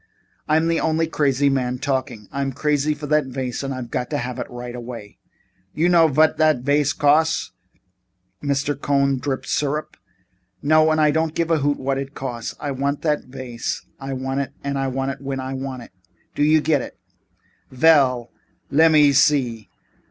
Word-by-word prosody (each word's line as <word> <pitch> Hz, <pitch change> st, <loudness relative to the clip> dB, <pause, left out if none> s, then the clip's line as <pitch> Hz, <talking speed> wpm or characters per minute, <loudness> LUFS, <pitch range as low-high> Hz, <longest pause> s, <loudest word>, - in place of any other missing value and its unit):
I'm 160 Hz, +2 st, +2 dB
the 165 Hz, 0 st, +1 dB
only 160 Hz, 0 st, +1 dB
crazy 145 Hz, -3 st, +1 dB
man 125 Hz, -2 st, 0 dB
talking. 130 Hz, -6 st, -3 dB
I'm 140 Hz, -1 st, -2 dB
crazy 150 Hz, +1 st, 0 dB
for 150 Hz, 0 st, -7 dB
that 150 Hz, -1 st, +1 dB
vase 130 Hz, -2 st, -4 dB
and 135 Hz, -1 st, -4 dB
I've 130 Hz, -3 st, -6 dB
got 125 Hz, -, -2 dB
to 145 Hz, -, -1 dB
have 125 Hz, -1 st, -4 dB
it -, -, -5 dB
right 120 Hz, 0 st, -7 dB
away." 115 Hz, -4 st, -9 dB, 0.6 s
"You 170 Hz, +3 st, +2 dB
know 170 Hz, -2 st, +6 dB
vot 155 Hz, +2 st, +3 dB
dot 155 Hz, -5 st, +3 dB
vase 145 Hz, +1 st, +2 dB
costs?" 155 Hz, +3 st, +2 dB, 0.9 s
Mr. 140 Hz, 0 st, 0 dB
B. 140 Hz, -, -14 dB
Cohn's 140 Hz, -1 st, +2 dB
voice -, -, -9 dB
dripped 135 Hz, -2 st, -3 dB
syrup. 150 Hz, +1 st, -2 dB, 0.7 s
"No, 155 Hz, +1 st, +4 dB
and 155 Hz, 0 st, +2 dB
I 150 Hz, -1 st, +4 dB
don't 160 Hz, +1 st, -1 dB
give 170 Hz, 0 st, 0 dB
a 160 Hz, -, +3 dB
hoot 145 Hz, 0 st, +1 dB
what 135 Hz, 0 st, -1 dB
it 135 Hz, +1 st, -6 dB
costs. 120 Hz, -4 st, -5 dB
I 145 Hz, -, -3 dB
want 140 Hz, +2 st, -2 dB
what 150 Hz, -2 st, +1 dB, 0.8 s
I 135 Hz, 0 st, -5 dB
want 135 Hz, 0 st, -3 dB
when 135 Hz, -1 st, -4 dB
I 130 Hz, 0 st, -4 dB
want 130 Hz, -2 st, -5 dB
it. -, -, -15 dB, 0.4 s
Do -, -, -4 dB
I 155 Hz, +2 st, +5 dB
get 150 Hz, -3 st, +2 dB
it?" -, -, -9 dB, 0.7 s
"Ve 130 Hz, +4 st, -2 dB
ell, 130 Hz, -7 st, +4 dB, 0.4 s
lemme 150 Hz, -1 st, +5 dB
see. 130 Hz, -, +2 dB
140 Hz, 175 wpm, -22 LUFS, 130-150 Hz, 0.9 s, know